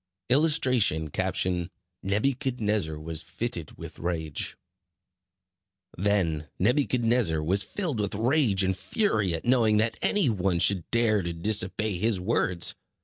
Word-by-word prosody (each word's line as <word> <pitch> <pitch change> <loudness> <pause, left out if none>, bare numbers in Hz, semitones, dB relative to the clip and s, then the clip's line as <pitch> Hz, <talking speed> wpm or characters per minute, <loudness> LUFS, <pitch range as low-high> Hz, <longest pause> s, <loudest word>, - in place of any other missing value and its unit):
[Illustration: 125 - +2 0.9
Nebuchadnezzar 105 - 0
was 80 0 -1
fitted 85 0 -5
with - - -10
rage] 80 -4 -3 1.4
Then 85 -6 0
Nebuchadnezzar 120 - +2
was 95 +6 +2
filled 160 - -3
with 100 -1 -2
rage 115 -3 +2
and 95 0 0
fury 105 - 0
at 80 - -7
knowing 115 -4 +3
that 110 +2 0
any 205 -7 +2
one 95 -5 0
should 90 0 +1
dare 115 -3 +2
to 85 -1 -4
disobey 100 +2 -1
his 110 -1 0
words. 90 -1 0
105 Hz, 115 wpm, -27 LUFS, 85-120 Hz, 1.4 s, knowing